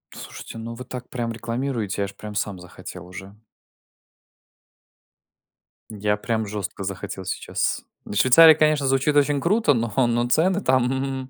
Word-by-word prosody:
Слушайте, 115 - -9
ну, 115 +1 -6
вы 125 +2 -9
так 125 -1 -8
прям 120 -2 -3
рекламируете, 115 -3 -3
я - - +1
аж 100 - -9
прям 105 -1 -9
сам 100 -3 -2
захотел 90 0 -10
уже. 95 +2 -10 2.6
Я 105 -1 -1
прям 110 0 -2
жёстко 100 -1 -5
захотел 95 0 -5
сейчас. - - -2 0.2
"В - - -7
Швейцарии"- 145 +10 +8
конечно, 155 -2 +2
звучит 135 +2 +2
очень 145 -1 +3
круто, 200 -3 +3
но, 115 -3 -1 0.2
но 120 +1 +1
цены 185 +8 +2
там! 130 -1 0
120 Hz, 145 wpm, -23 LUFS, 105-135 Hz, 2.6 s, Швейцарии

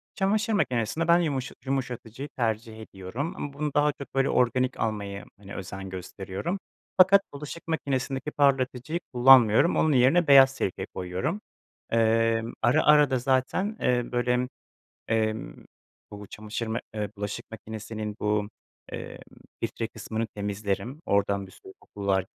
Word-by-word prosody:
Çamaşır 215 +3 +1
makinesinde 130 - 0
ben 170 +1 +6
yumuşa 140 -6 -2
yumuşatıcıyı 130 0 -4
tercih 110 -1 -2
ediyorum 110 - -5
ama 145 -1 -5
bunu 150 0 -3
daha 150 0 +3
çok 140 - -11
böyle 135 0 +2
organik 125 +1 +1
almaya, 100 -2 -3
hani, 100 -1 -11
özen 95 0 -6
gösteriyorum. 95 - -5 0.4
Fakat 195 +2 +7
bulaşık 150 +4 -8
makinesindeki 135 -2 -2
parlatıcıyı 135 +2 +1
kullanmıyorum, 125 +2 +6
onun 155 -2 +3
yerine 135 +7 +4
beyaz 135 -1 +8
sirke 95 - -2
koyuyorum. 90 - -3 0.5
Emm, 115 0 +2
ara 120 +2 +3
ara 150 -1 +6
da 130 -2 +1
zaten, 135 - 0
eee, 125 -1 +1
böyle, 125 +1 +1 0.6
emm, 110 - -1 0.5
bu 105 0 -9
çamaşır 110 +3 -5
mak 110 +1 -2
ııı, 105 -1 -2
bulaşık 105 0 -5
makinesinin 110 -1 -6
bu, 105 0 0 0.4
eee, - - -7 0.4
filtre - - -3
kısmını 110 +1 -4
temizlerim, 105 +6 -4
oradan 100 -1 +1
bir 95 - -16
sürü 95 - -14
kokular. 100 -2 -1
120 Hz, 135 wpm, -27 LUFS, 105-140 Hz, 0.6 s, beyaz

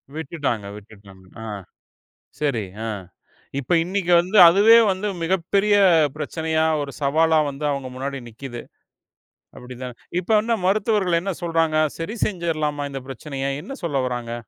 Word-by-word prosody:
விட்டுட்டாங்க. 140 -9 -3
விட்டுட்டாங்க. 100 -2 -16 0.2
அ. - - -7 1.0
சரி 130 -8 0 0.2
அ - - -3 0.7
இப்ப 140 +6 -2
இன்னிக்கு 180 0 -1
வந்து 190 +4 -1
அதுவே 205 +6 +7
வந்து 190 +3 -3
மிகப் 170 0 0
பெரிய 205 +1 +4 0.4
பிரச்சனையா, 160 +1 -1 0.2
ஒரு 140 -1 -5
சவாலா 160 +3 +3
வந்து 140 +2 -8
அவங்க 135 -2 -3
முன்னாடி 135 +1 -4
நிக்குது. 120 +1 -8 0.9
அப்படித்தான். 125 0 -8 0.2
இப்ப 185 +5 -4
என்ன 230 +1 -1
மருத்துவர்கள் 195 -3 +2
என்ன 195 +1 -2
சொல்றாங்க? 165 -2 +1 0.2
சரி, 165 +7 -4
செஞ்சிரலாமா 155 -6 -2
இந்தப் 135 -1 -7
பிரச்சனைய? 135 +1 -4
என்ன 275 - -7
சொல்ல 140 -4 0
வராங்க? 120 -1 -4
155 Hz, 135 wpm, -22 LUFS, 135-180 Hz, 1.0 s, அதுவே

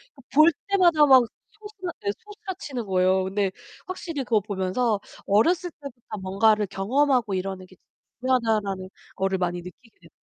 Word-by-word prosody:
그 275 - -16
볼 310 +4 +7 0.2
때마다 350 -6 +5
막 265 -3 +7 0.3
소스라 415 -4 -8
네 200 - 0
소스라치는 380 - -7
거예요. 185 0 +2
근데 195 +1 -1 0.4
확실히 335 -6 -4
그거 225 -4 +2
보면서 200 +3 -1 0.3
'어렸을 340 - +2
때부터 245 -6 -9
뭔가를 210 +2 +2
경험하고 245 +3 +1
이러는 190 0 -3
게 185 - -19 0.4
중요하다.'라는 220 -7 0 0.3
거를 195 0 0
많이 175 -1 -2
느끼게 180 +7 -13
되는 165 - -17
225 Hz, 350 characters per minute, -25 LUFS, 190-290 Hz, 0.4 s, 볼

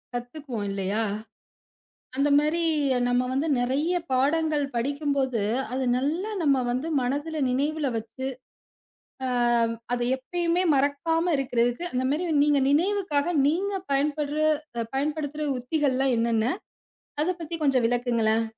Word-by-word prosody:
கத்துக்குவோம் 245 -3 -5
இல்லையா? 200 +3 0 1.1
அந்த 280 +2 +2
மாரி 310 +3 +1 0.5
நம்ம 245 0 +2
வந்து 285 +5 0
நெறைய 285 +8 0 0.2
பாடங்கள் 295 +3 +2
படிக்கும்போது 275 -2 0 0.3
அது 260 0 -1
நல்லா 320 +11 -1
நம்ம 275 -4 +3
வந்து 255 +7 -2
மனதுல 290 +5 -2
நினைவுல 290 +2 0
வச்சு, 230 +4 -6 1.0
அ - - -1 0.6
அதை 245 0 0
எப்பவுமே 345 +6 0
மறக்காம 325 +5 +1
இருக்கறதுக்கு 245 +2 0
அந்த 255 0 0
மாரி 305 +5 0 0.2
நீங்க 290 -1 +3
நினைவுக்காக 345 -1 +1
நீங்கப் 380 +5 -1
பயன்பட்ற 290 +1 0 0.6
பயன்படுத்துற 300 +1 -2
உத்திகள்லாம் 265 -1 +1
என்னன்ன? 230 +3 +1 0.7
அதப் 355 +2 -1
பத்தி 330 0 -5
கொஞ்சம் 260 -4 +3
விளக்குங்களேன். 230 -2 +1
280 Hz, 110 wpm, -26 LUFS, 250-315 Hz, 1.1 s, நம்ம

